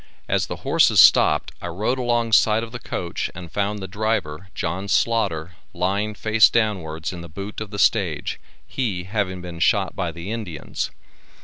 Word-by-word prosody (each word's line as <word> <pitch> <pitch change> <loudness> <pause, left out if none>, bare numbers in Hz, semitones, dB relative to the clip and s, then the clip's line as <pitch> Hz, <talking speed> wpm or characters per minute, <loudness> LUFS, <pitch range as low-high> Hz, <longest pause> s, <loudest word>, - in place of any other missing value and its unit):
As - - +1
the - - -4
horses - - +4
stopped 75 - +6
I - - -4
rode 105 +9 -1
along 120 -2 0
side 110 0 +4
of 115 - -7
the 120 - -6
coach 85 -6 -4
and 85 -2 -9
found 105 +1 -1
the 95 -2 -6
driver 95 -5 -2
John 90 +4 -3
Slaughter, 100 -7 +1 0.2
lying 100 +4 -1
face 110 +1 +5
downwards 90 -8 -1
in 85 - -7
the 85 - -10
boot 100 +7 -7
of 110 - -5
the 100 - -7
stage, 95 -7 +1 0.3
he 105 -9 -2
having 95 -1 -2
been 85 -2 -7
shot - - +2
by 85 - -2
the 85 +5 -7
Indians. 100 -10 -4
100 Hz, 175 wpm, -23 LUFS, 85-110 Hz, 0.3 s, stopped